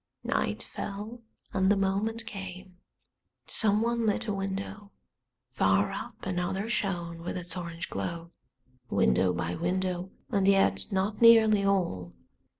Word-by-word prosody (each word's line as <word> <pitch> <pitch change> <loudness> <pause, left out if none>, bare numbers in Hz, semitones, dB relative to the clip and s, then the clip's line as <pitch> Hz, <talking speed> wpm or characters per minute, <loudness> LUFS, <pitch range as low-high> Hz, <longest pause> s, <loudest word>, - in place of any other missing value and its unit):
Night - - -1
fell, 210 +4 -6 0.3
and 190 +1 +3
the 205 - +3
moment 205 +4 -1
came. 190 -3 -8 0.7
Someone 225 +2 +2
lit 210 - +1
a 210 - 0
window, 195 +1 -4 0.6
far - - +2
up - - -7
another 185 +2 -2
shone 175 -6 -2
with 175 - -4
its 180 0 -5
orange 170 -2 -5
glow. 165 - -5 0.6
Window 75 +9 +3
by 85 -1 -2
window, 180 - -1 0.2
and 195 -3 +2
yet 195 0 +3
not 200 +2 -1
nearly 220 -3 +7
all. 170 - 0
195 Hz, 125 wpm, -29 LUFS, 175-210 Hz, 0.7 s, nearly